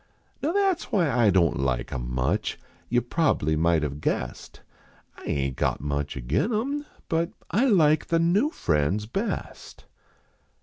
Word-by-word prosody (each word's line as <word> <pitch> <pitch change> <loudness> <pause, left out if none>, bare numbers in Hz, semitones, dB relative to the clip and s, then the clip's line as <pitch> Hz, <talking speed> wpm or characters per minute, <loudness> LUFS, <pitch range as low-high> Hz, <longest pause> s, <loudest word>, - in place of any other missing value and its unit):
Now 305 - 0
that 390 -3 +3
s - - -9
why 170 -8 +1
I 120 -3 +4
don 85 -5 +3
t - - -2
like 65 -3 -1
em - - -4
much. 70 +12 -1 0.3
You 120 +1 +2
prob 150 +4 +1
bly 80 +1 +1
might 80 0 +2
have 75 0 -4
guessed. - - -3 0.5
I - - -13
aint 70 -2 -1
got - - 0
much 70 0 -3
agin 65 - 0
em. 280 +7 -1 0.2
but 165 +1 0 0.2
I 235 +7 +3
like 155 - +4
the 165 - +2
new 180 - +3
friends 85 - 0
best. 195 - -5
105 Hz, 165 wpm, -26 LUFS, -, 0.5 s, I